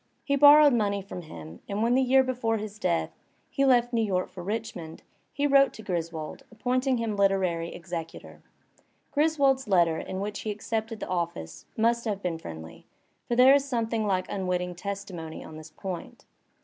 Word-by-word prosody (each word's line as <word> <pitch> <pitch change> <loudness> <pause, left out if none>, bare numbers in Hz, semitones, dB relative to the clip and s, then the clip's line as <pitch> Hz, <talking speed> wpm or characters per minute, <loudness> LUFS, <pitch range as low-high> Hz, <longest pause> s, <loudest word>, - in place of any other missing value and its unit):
He 280 - +1
borrowed 290 0 +8
money 200 -4 0
from 185 -2 -7
him, 80 - -10
and 205 +2 -1
when 235 +1 +3
the 260 - +4
year 265 +1 +5
before 245 -3 -1
his 210 0 -7
death, 180 -4 0 0.4
he 275 - +1
left 245 -2 +3
New 230 - +2
York 190 -4 0
for 180 - -8
Richmond^ 195 -6 -5 0.3
he 285 - -1
wrote 275 -1 +5
to 220 - -10
Griswold 165 -5 -4
appointing 255 +3 0
him 225 -2 -2
literary 185 -4 +1
executor. 170 -2 -7 0.7
Griswold's 280 -3 +2
letter 170 -5 +3
in 190 - -5
which 205 +1 -4
he 215 - -4
accepted 220 +1 -3
the - - -4
office 170 - -4
must 235 +1 +2
have 205 -3 -1
been 170 -3 -2
friendly, 80 - -10 0.4
for 240 - 0
there 255 +2 +7
is 280 -1 +4
something 230 -4 -1
like 185 -2 +1
unwitting 180 -2 -2
testimony 180 -3 -6
on 160 - -11
this 155 0 -10
point. 185 +1 -7
205 Hz, 175 wpm, -27 LUFS, 175-245 Hz, 0.7 s, borrowed